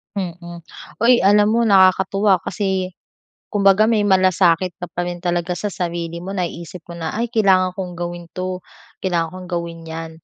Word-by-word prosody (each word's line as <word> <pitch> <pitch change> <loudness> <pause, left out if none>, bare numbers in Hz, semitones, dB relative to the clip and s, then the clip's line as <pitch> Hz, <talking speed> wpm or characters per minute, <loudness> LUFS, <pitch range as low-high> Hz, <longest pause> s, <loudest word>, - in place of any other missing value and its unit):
Mm. 175 -2 -6 0.4
Hoy, 240 +1 +5
alam 205 +2 +4
mo, 235 0 +2
nakakatuwa 190 0 +4
kasi 190 -2 -2 0.6
kumbaga, 200 +1 +4
may 220 -2 +3
malasakit 185 -2 +3
ka 175 - -4
pa 175 - -3
rin 175 0 -4
talaga 175 0 -1
sa 210 - -2
sarili 170 -1 -4
mo. 195 +2 -5
Naisip 175 -2 -5
mo 170 - -8
na, 160 -1 -4
ay, 235 +2 -2
kailangan 190 -5 +3
kong 185 -2 -5
gawin 175 0 -5
'to, 185 0 -4 0.4
kailangan 170 -3 0
kong 185 -1 -9
gawin 170 -1 -4
'yan. 165 0 -6
185 Hz, 165 wpm, -20 LUFS, 175-195 Hz, 0.6 s, Hoy